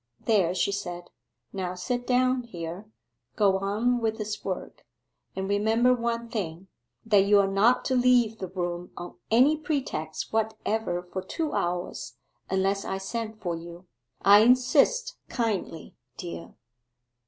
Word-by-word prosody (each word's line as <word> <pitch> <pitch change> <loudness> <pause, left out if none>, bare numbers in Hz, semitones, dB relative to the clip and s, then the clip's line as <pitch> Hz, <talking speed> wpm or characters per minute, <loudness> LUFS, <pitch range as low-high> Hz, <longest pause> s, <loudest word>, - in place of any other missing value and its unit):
'There,' 190 -6 +3
she 185 +2 +1
said, 175 -3 -5 0.4
'now 185 -2 -3
sit 245 +6 -3
down 255 0 +3
here, 180 -3 -7 0.5
go 195 -3 +3
on 220 +5 +1
with 220 -1 0
this 215 -1 -5
work, 185 -2 -5 0.5
and 190 0 -3
remember 220 +5 +3
one 235 -1 -2
thing 190 -5 -5 0.4
that 205 -3 +4
you 205 +1 +5
are 200 - +4
not 205 +6 +3
to 260 - 0
leave 245 -3 +3
the 190 - -4
room 175 -1 -4
on 175 0 -7
any 255 +7 +5
pretext 260 - -3
whatever 220 -4 -1
for 185 +1 -5
two 315 - -3
hours 175 +1 -3 0.3
unless 195 +1 +1
I 190 - -3
send 220 +2 -5
for 175 -5 -2
you 170 +2 -10 0.4
I 200 +2 +8
insist 275 - +3
kindly, 210 -9 -3 0.2
dear. 170 -1 -7
205 Hz, 140 wpm, -27 LUFS, 180-235 Hz, 0.5 s, I